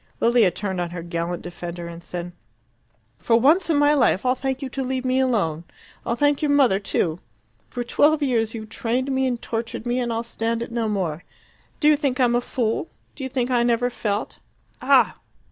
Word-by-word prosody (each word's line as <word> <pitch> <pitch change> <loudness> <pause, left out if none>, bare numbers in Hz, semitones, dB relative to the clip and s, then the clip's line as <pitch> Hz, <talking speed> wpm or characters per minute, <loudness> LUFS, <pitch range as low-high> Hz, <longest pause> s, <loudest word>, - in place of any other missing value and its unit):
Lilia 235 -4 +4
turned 190 0 -3
on 175 - -2
her 170 -1 -6
gallant 170 0 -3
defender 175 0 -7
and 170 0 -9
said 175 0 -6 0.9
"For 230 0 +3
once 325 +9 +4
in 315 - +3
my 290 0 +4
life 255 -7 +2
I'll 250 - +4
thank 265 +1 -3
you 265 - -4
to 270 - -4
leave 260 0 -2
me 255 +1 +2
alone. 200 -12 0 0.4
I'll 235 - +1
thank 290 +2 +2
your 300 - +1
mother 270 -9 +4
too. 175 -4 -1 0.5
For 245 - -4
twelve 295 +5 +3
years 230 -4 0
you've 220 -1 -7
trained 245 +4 -1
me 265 0 +1
and 245 -2 -2
tortured 230 0 -4
me, 245 +1 0
and 240 -1 -1
I'll 230 0 -1
stand 230 0 -2
it 235 - -9
no 230 -2 -1
more. 180 -5 -2 0.6
Do 300 - +3
you 305 - +7
think 280 -4 -1
I'm 245 -2 +3
a 240 - +2
fool? 240 +3 -2 0.2
Do 280 - -8
you 260 - -3
think 255 -1 -1
I 245 -1 +3
never 240 +1 +1
felt? 210 -3 -3 0.4
Ah! - - +4
235 Hz, 205 wpm, -23 LUFS, 200-260 Hz, 0.9 s, you